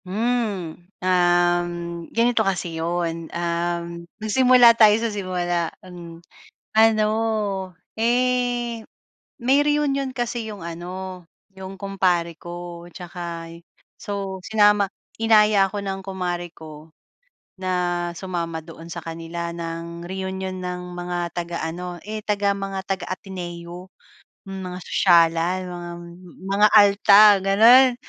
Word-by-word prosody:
Hmm, 205 Hz, -5 st, -2 dB, 0.2 s
um, 175 Hz, -1 st, +2 dB, 0.4 s
ganito 235 Hz, 0 st, +2 dB
kasi 185 Hz, -4 st, -1 dB
iyon, 165 Hz, -1 st, -2 dB
um, 170 Hz, 0 st, -3 dB
magsimula 245 Hz, +2 st, +6 dB
tayo 215 Hz, -2 st, +6 dB
sa 225 Hz, -1 st, -2 dB
simula 175 Hz, -4 st, -1 dB, 0.2 s
an 170 Hz, -2 st, -11 dB, 0.5 s
ano 220 Hz, -1 st, +4 dB, 0.9 s
eh, 240 Hz, -1 st, 0 dB, 0.5 s
may 260 Hz, +3 st, +3 dB
reunion 290 Hz, -2 st, 0 dB
kasi 240 Hz, -3 st, -3 dB
iyong 200 Hz, -5 st, -8 dB
ano, 180 Hz, +2 st, -7 dB, 0.3 s
iyong 190 Hz, 0 st, -9 dB
kumpare 180 Hz, -4 st, 0 dB
ko 175 Hz, +1 st, -9 dB
at -, -, -12 dB
saka 170 Hz, -1 st, -7 dB
y 170 Hz, -, -14 dB, 0.4 s
so 195 Hz, -3 st, -5 dB
sinama 205 Hz, -1 st, +3 dB, 0.3 s
inaya 210 Hz, -3 st, +5 dB
ako 205 Hz, -, -4 dB
ng 195 Hz, -1 st, -4 dB
kumare 180 Hz, -2 st, -4 dB
ko 155 Hz, -1 st, -12 dB, 0.7 s
na 185 Hz, 0 st, -3 dB, 0.4 s
sumama 170 Hz, -3 st, -4 dB
doon 165 Hz, +1 st, -12 dB
sa 170 Hz, 0 st, -7 dB
kanila 165 Hz, +1 st, -5 dB
ng 170 Hz, 0 st, -6 dB
reunion 190 Hz, 0 st, -4 dB
ng 180 Hz, 0 st, -5 dB
mga 175 Hz, -1 st, -4 dB
taga 170 Hz, -2 st, -3 dB
ano, 175 Hz, +2 st, -6 dB
eh, 215 Hz, 0 st, -5 dB
taga 205 Hz, -1 st, 0 dB
mga 195 Hz, -1 st, -4 dB
taga-Ateneo 180 Hz, -1 st, -6 dB, 0.5 s
mga 190 Hz, -2 st, -7 dB
sosyalan 170 Hz, 0 st, +3 dB
mga 175 Hz, -1 st, -7 dB, 0.6 s
mga 205 Hz, +2 st, +5 dB
alta 205 Hz, 0 st, +7 dB, 0.2 s
ganun. 230 Hz, +7 st, +6 dB
185 Hz, 110 wpm, -23 LUFS, 170-210 Hz, 0.9 s, alta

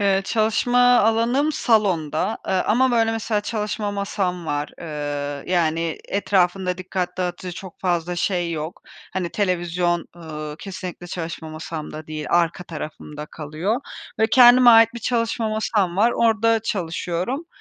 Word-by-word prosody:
Eee, 195 Hz, -1 st, +2 dB
çalışma 225 Hz, +4 st, +1 dB, 0.2 s
alanım 235 Hz, +7 st, +2 dB
salonda, 200 Hz, -, +1 dB
ııı, 190 Hz, -1 st, +2 dB
ama, 255 Hz, +4 st, +3 dB
böyle, 225 Hz, -1 st, +2 dB
mesela, 220 Hz, -1 st, -1 dB
çalışma 210 Hz, -1 st, -3 dB
masam 195 Hz, -3 st, -2 dB
var, 145 Hz, -1 st, -2 dB
ııı, 145 Hz, -2 st, -4 dB
yani, 165 Hz, -2 st, 0 dB
etrafında 185 Hz, -2 st, +1 dB
dikkat 185 Hz, 0 st, -3 dB
dağıtıcı 180 Hz, 0 st, -3 dB
çok 190 Hz, -3 st, -10 dB
fazla 175 Hz, -1 st, -1 dB
şey 175 Hz, -1 st, 0 dB
yok. 155 Hz, +2 st, -5 dB, 0.3 s
Hani, 180 Hz, -2 st, -2 dB
televizyon, 175 Hz, -3 st, 0 dB
ııı, 155 Hz, -2 st, -7 dB
kesinlikle 185 Hz, -2 st, -7 dB
çalışma 170 Hz, -2 st, -5 dB
masamda 155 Hz, -1 st, -7 dB
değil, 155 Hz, -1 st, -5 dB
arka 175 Hz, +1 st, +1 dB
tarafımda 150 Hz, -2 st, -7 dB
kalıyor 160 Hz, -, -3 dB, 0.4 s
ve 220 Hz, -, +4 dB
kendime 245 Hz, -1 st, +8 dB
ait 225 Hz, 0 st, +6 dB
bir 235 Hz, -, -6 dB
çalışma 230 Hz, -1 st, 0 dB
masam 210 Hz, -4 st, 0 dB
var. 230 Hz, +4 st, +4 dB
Orda 230 Hz, 0 st, +3 dB
çalışıyorum, 185 Hz, -, -2 dB
185 Hz, 135 wpm, -22 LUFS, 165-220 Hz, 0.4 s, kendime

